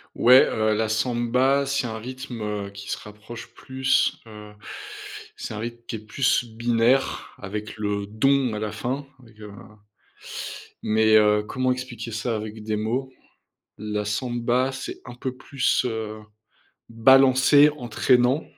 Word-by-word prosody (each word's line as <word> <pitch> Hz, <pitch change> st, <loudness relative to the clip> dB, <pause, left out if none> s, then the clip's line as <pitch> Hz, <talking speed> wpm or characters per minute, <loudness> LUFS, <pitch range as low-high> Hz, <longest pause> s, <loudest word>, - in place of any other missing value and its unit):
Ouais, 125 Hz, +2 st, +7 dB
heu, 110 Hz, 0 st, +1 dB
la 110 Hz, +1 st, 0 dB
samba, 125 Hz, +4 st, +1 dB
c'est 140 Hz, -2 st, -1 dB
un 110 Hz, -1 st, -5 dB
rythme, 125 Hz, 0 st, -7 dB
heu, 105 Hz, -1 st, -3 dB
qui 100 Hz, 0 st, -10 dB
se -, -, -2 dB
rapproche 110 Hz, +2 st, -10 dB
plus, 130 Hz, 0 st, +1 dB
heu, 105 Hz, -1 st, -12 dB, 0.8 s
c'est -, -, -6 dB
un -, -, -6 dB
rythme 120 Hz, +1 st, -6 dB
qui 115 Hz, -, -4 dB
est -, -, -9 dB
plus 120 Hz, +4 st, +1 dB
binaire 120 Hz, +3 st, +1 dB
avec 105 Hz, +1 st, -6 dB
le 105 Hz, -1 st, -2 dB
dong 130 Hz, +3 st, +2 dB
à -, -, -3 dB
la 105 Hz, 0 st, -3 dB
fin, 125 Hz, +6 st, -3 dB, 0.2 s
avec, 115 Hz, -3 st, -19 dB
heu, 105 Hz, -1 st, -9 dB, 1.3 s
mais, 110 Hz, 0 st, +3 dB
heu, 105 Hz, 0 st, +4 dB
comment 130 Hz, +4 st, -1 dB
expliquer 125 Hz, -2 st, -5 dB
ça 115 Hz, +1 st, -2 dB
avec 110 Hz, 0 st, -6 dB
des 110 Hz, 0 st, -2 dB
mots? 120 Hz, +5 st, -2 dB, 0.7 s
La 105 Hz, 0 st, -3 dB
samba, 120 Hz, +3 st, 0 dB
c'est 135 Hz, 0 st, -7 dB
un 120 Hz, -, -8 dB
peu 125 Hz, +1 st, -5 dB
plus, 135 Hz, 0 st, 0 dB
heu, 110 Hz, -2 st, -4 dB, 0.7 s
balancé, 135 Hz, +4 st, +6 dB
entraînant 125 Hz, +3 st, +2 dB
115 Hz, 145 wpm, -24 LUFS, 110-130 Hz, 1.3 s, Ouais